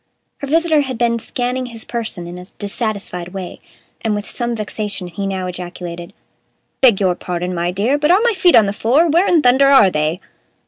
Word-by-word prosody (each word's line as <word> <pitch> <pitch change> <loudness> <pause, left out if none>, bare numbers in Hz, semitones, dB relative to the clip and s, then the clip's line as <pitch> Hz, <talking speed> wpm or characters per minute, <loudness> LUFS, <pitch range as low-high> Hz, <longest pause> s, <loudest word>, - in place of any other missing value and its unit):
Her 280 - -5
visitor 320 0 +3
had 260 -4 -4
been 235 0 +1
scanning 250 +2 -3
his 230 -2 -8
person 225 -7 -4
in 175 +1 -8
a 180 - -10
dissatisfied 200 -4 -4
way, 185 -2 -6 0.4
and 220 -2 0
with 205 0 -5
some 240 -1 -3
vexation 210 -2 -3
he 185 +3 -5
now 190 -1 -3
ejaculated: 175 -1 -7 0.7
"Beg 235 -7 +5
your 185 -3 +2
pardon, 180 0 -4
my 175 0 -1
dear, 215 +10 0
but 300 +1 +1
are 365 +3 +6
my 475 -1 +3
feet 365 -3 +4
on 220 - +6
the 200 - -2
floor, 240 +9 +3
or 340 - 0
where 340 +5 +3
in 330 -4 +3
thunder 260 +3 +5
are 220 -9 +6
they?" 155 +2 -1
215 Hz, 200 wpm, -18 LUFS, 180-260 Hz, 0.7 s, are